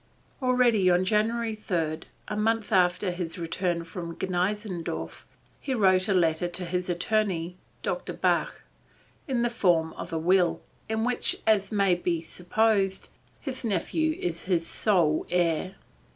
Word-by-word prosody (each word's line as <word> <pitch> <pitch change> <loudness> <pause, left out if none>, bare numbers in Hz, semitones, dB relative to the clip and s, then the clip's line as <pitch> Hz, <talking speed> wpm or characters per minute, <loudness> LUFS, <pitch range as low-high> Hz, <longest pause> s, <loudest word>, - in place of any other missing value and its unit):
Already 245 -7 +3
on 180 +1 +3
January 225 +3 +1
3, 165 -7 -2 0.3
a 210 - -3
month 220 +1 0
after 180 +1 +3
his 175 -1 -4
return 170 0 -1
from 170 0 -7
Gneixendorf, 185 0 -3 0.3
he 265 -3 -2
wrote 185 -4 +3
a - - +3
letter 165 -1 +2
to 180 +1 -2
his 180 +1 -2
attorney, 180 -1 0 0.3
Dr. - - -3
Bach, - - 0 0.6
in 250 -4 0
the 240 - +2
form 170 -8 +2
of 170 - -7
a 165 - -1
will, 175 +1 +3 0.3
in 220 0 0
which 250 0 0
as 205 -2 +3
may 200 -3 +3
be 175 -1 0
supposed, 195 +3 0 0.3
his 265 -3 -4
nephew 240 - 0
is 170 -1 -3
his 175 -3 +1
sole 170 -8 +1
heir. 175 +1 0
185 Hz, 140 wpm, -27 LUFS, 175-215 Hz, 0.6 s, Already